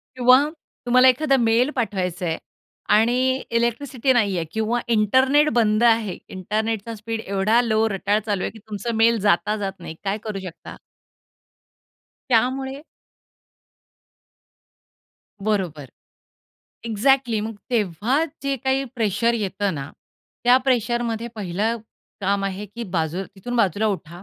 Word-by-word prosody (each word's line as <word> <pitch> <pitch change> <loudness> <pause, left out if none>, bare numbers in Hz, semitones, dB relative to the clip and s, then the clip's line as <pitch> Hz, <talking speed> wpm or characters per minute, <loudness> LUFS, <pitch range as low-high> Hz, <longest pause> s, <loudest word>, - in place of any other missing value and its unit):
किंवा 255 +2 +6 0.4
तुम्हाला 255 +1 +5
एखादा 275 +2 +2
मेल 235 +2 +3
पाठवायचंय 180 -7 -2 0.6
आणि 230 +3 +3 0.4
इलेक्ट्रिसिटी 250 +2 0
नाहीये 200 -7 +1
किंवा 220 +2 0
इंटरनेट 260 +8 +4
बंद 215 -1 +3
आहे. 225 -5 +3
इंटरनेटचा 215 +3 -3
स्पीड 225 +1 -5
एवढा 200 +5 +2
लॉ 220 -1 +2
रटाळ 200 +2 +1
चालू 205 -3 -1
आहे - - -2
की 225 - -14
तुमचा 215 +2 -5
मेल 230 -1 +4
जाता 205 +1 +2
जाता 195 -3 -5
नाही. 160 - -7
काय 200 +1 -1
करू 210 -3 -4
शकता? 170 - -10 1.6
त्यामुळे 265 +3 +1 2.6
बरोबर. 185 -9 -1 1.0
एक्झॅक्टली 235 +1 +2
मग 220 +1 -4 0.2
तेव्हा 225 - +1 0.2
जे 275 0 -1
काही 265 +2 0
प्रेशर 230 0 +1
येतं 200 -2 -1
ना, 140 -1 -6 0.5
त्या 245 +1 +7
प्रेशरमध्ये 240 -2 0
पहिलं 210 +3 -1 0.4
काम 200 0 0
आहे 195 +1 -4
की 230 +4 -8
बाजू 165 +2 -1
तिथून 245 +6 -5
बाजूला 205 -1 +2
उठा. 175 -4 -4
220 Hz, 120 wpm, -22 LUFS, 195-240 Hz, 2.6 s, त्या